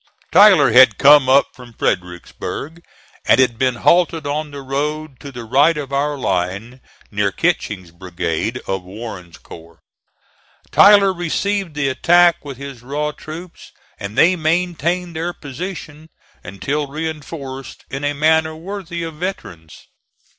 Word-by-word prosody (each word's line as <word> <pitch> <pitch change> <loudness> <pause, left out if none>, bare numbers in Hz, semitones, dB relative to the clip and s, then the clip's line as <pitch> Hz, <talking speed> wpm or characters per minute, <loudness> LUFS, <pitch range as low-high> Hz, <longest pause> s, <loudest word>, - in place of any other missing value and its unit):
Tyler 200 - +6
had 130 +3 +6
come 145 -2 +6
up 135 +2 +4
from 125 -3 -14
Fredericksburg, 95 - -4 0.4
and 115 - +5
had 125 -3 +2
been 130 -1 +1
halted 165 +3 +2
on 150 +1 -3
the 140 -1 -9
road 145 +1 -4
to 140 - -9
the 120 -2 -8
right 140 +8 +3
of 140 -2 -6
our 145 +1 0
line, 100 +4 -3 0.3
near 100 -1 0
Kitching's 105 - -2
brigade 85 +6 -3
of 95 -1 -2
Warren's 95 -2 -9
corps. 85 0 -14 0.9
Tyler 200 -1 +6
received 185 0 -2
the 145 -2 0
attack 175 +5 +3
with 140 -3 -8
his 140 -3 -9
raw 145 +4 -3
troops, 165 +4 -11 0.3
and 100 +1 -7
they 180 +2 +5
maintained 175 +1 -1
their 170 +2 -3
position, 155 +1 -8 0.3
until 135 +11 -3
reinforced, 145 -3 -7
in 135 +1 -5
a 145 0 0
manner 160 +2 +2
worthy 175 0 -6
of 165 -1 -5
veterans. 90 - -7
145 Hz, 135 wpm, -18 LUFS, 120-165 Hz, 0.9 s, Tyler